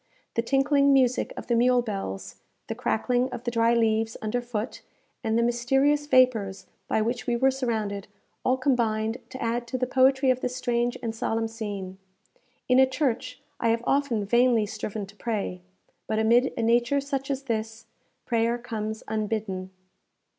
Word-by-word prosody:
The 230 - +1
tinkling 275 +3 +3
music 255 -2 +2
of - - -6
the 240 - 0
mule 245 +1 +4
bells, 195 - -5 0.3
the - - -4
crackling 250 +3 0
of 245 -2 -7
the 240 - -2
dry 230 0 +3
leaves 225 -1 +1
under 220 +3 -2
foot, 240 -1 -4 0.4
and 225 0 +1
the 235 - +3
mysterious 270 +5 +2
vapours 240 -8 +3 0.2
by 220 - +1
which 235 0 -3
we 240 - +2
were 265 +3 +3
surrounded, 220 -6 -2 0.4
all 255 +1 +2
combined 230 -4 0
to 260 - -8
add 235 +1 -1
to 255 - -3
the 255 - 0
poetry 265 +1 +4
of 255 - 0
this 250 0 -2
strange 240 -1 0
and 225 -1 -2
solemn 225 0 -1
scene. 205 -4 -6 0.7
In 255 0 +5
a 265 - +6
church 260 -1 -2 0.2
I 230 - +1
have 230 +1 +1
often 270 -7 +1
vainly 235 0 +3
striven 215 0 -5
to 200 +2 -16
pray; 205 -5 -3 0.5
but 220 - -1
amid 235 +4 +4
a 230 - 0
nature 240 +4 +3
such 275 -1 -3
as 275 -1 -2
this, 225 -2 -3 0.4
prayer 230 0 +1
comes 220 -2 -5
unbidden. 210 -3 -2
235 Hz, 170 wpm, -26 LUFS, 220-255 Hz, 0.7 s, a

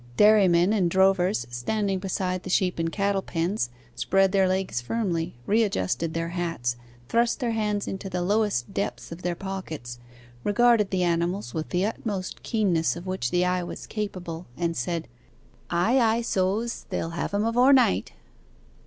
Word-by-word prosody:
Dairymen 200 -3 +5
and 190 -5 +2
drovers 190 - +3
standing 195 - -1
beside 185 -1 -2
the 185 - -8
sheep 180 -1 +1
and 165 0 0
cattle 200 0 0
pens, 170 - -1 0.2
spread 195 +9 +2
their 195 -1 +3
legs 185 -8 -1
firmly, 170 - -2
readjusted 165 - 0
their 165 0 -1
hats, 165 -9 -2 0.3
thrust 235 - +2
their 240 -3 0
hands 210 -2 -1
into 195 0 -5
the 180 -1 -2
lowest 200 - 0
depths 200 - -3
of 165 +2 -7
their 175 -1 -1
pockets, 160 -10 -6 0.4
regarded 230 -1 +4
the 185 -1 0
animals 170 -4 0
with 160 -1 -3
the 180 +1 +1
utmost 205 -3 -4
keenness 190 -8 +1
of 175 +1 -8
which 185 -10 -2
the 180 +4 +2
eye 180 0 +1
was 175 - -7
capable, 180 -6 -5
and 170 -1 -1
said, 165 +5 -2 0.6
'Ay, 180 +10 +3
ay, 230 -1 +3
so's: 215 +2 -1
they'll 165 - -2
have 170 - -3
him 205 +2 0
avore 245 +4 +4
night. 105 - +3
185 Hz, 160 wpm, -26 LUFS, 170-205 Hz, 0.6 s, Dairymen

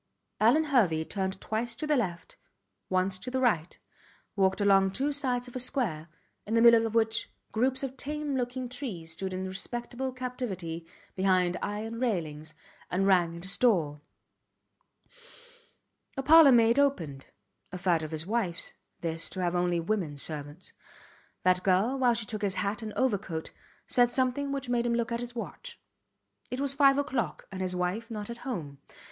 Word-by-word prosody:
Alvan 245 +9 +5
Hervey 200 - +2
turned 190 0 -3
twice 230 +2 -2
to 280 - -4
the 300 0 +2
left, 180 -9 -3 0.5
once 185 0 +1
to 250 - -5
the 260 +1 -1
right, 180 -10 +1 0.6
walked 190 -1 +2
along 195 -1 +4
two 270 +9 -1
sides 255 -4 -1
of 245 - -12
a - - -1
square, 210 - 0 0.4
in 220 - 0
the 230 - +4
middle 230 -1 +7
of 225 - -6
which 225 0 +1 0.2
groups 260 +4 +1
of 270 0 -4
tame 295 +1 -3
looking 250 0 -2
trees 230 - -5
stood 190 +3 -4
in 185 0 -3
respectable 240 +6 -4
captivity 200 -10 -5 0.3
behind 185 -2 +2
iron 220 +3 -4
railings, 160 -10 -2 0.3
and 190 +2 +1
rang 175 -3 +3
at 170 - -10
his 190 +1 -1
door. 160 -12 +2 2.2
A 270 - -1
parlour 315 -1 +8
maid 235 +1 +5
opened. 165 - 0 0.4
A 185 - -5
fad 175 -3 +2
of 155 - -5
his 160 0 -3
wifes, 195 -5 0 0.3
this, 165 -1 -1
to 190 - -6
have 175 -1 0
only 175 -1 +1
women 165 -5 -2
servants. 145 +3 -6 0.7
That 185 0 +3
girl, 195 +8 +2
while 245 -2 +4
she 230 -1 -1
took 215 0 -5
his 200 -2 0
hat 205 +3 -1
and 220 -1 -5
overcoat, 200 -10 -1 0.3
said 245 -1 +3
something 260 +3 0
which 275 -2 -3
made 240 -1 +1
him 235 - +1
look 235 0 -1
at 235 - -1
his 245 0 -6
watch. 475 - -7 0.7
It 250 +2 -4
was 280 -1 0
five 275 -1 +5
oclock, 280 -4 -1
and 190 -1 -5
his 185 -1 -2
wife 180 +6 -2
not 215 -1 -5
at 235 - -8
home. 160 - -5
220 Hz, 170 wpm, -29 LUFS, 180-250 Hz, 2.2 s, parlour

